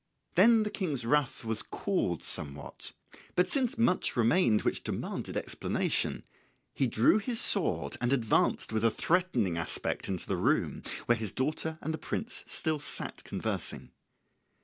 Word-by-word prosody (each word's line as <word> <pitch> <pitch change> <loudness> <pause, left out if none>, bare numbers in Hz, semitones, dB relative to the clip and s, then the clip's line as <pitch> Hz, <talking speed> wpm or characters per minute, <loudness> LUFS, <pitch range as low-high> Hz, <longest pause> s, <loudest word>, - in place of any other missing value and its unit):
Then 230 -2 +5
the 210 - -4
King's 150 - -2
wrath 140 -1 0
was 110 -1 0
cooled 90 - -2
somewhat; 70 0 0 0.4
but 180 - +3
since 255 -5 0
much 230 -6 +2
remained 115 - +3
which - - -1
demanded - - -4
explanation - - -1 0.5
he 135 - 0
drew 115 - +3
his 230 +2 0
sword 200 -5 +5
and 120 +1 0
advanced 115 -3 +1
with 110 0 0
a 115 - +5
threatening 120 - 0
aspect 85 - -1
into 95 -3 -3
the - - -2
room - - 0 0.2
where 120 -1 +2
his 110 -4 -3
daughter 155 +4 -2
and 160 - -2
the 160 - -5
prince 225 +3 -4
still 155 -2 0
sat 150 - -2
conversing. - - -4
140 Hz, 150 wpm, -30 LUFS, 110-185 Hz, 0.5 s, Then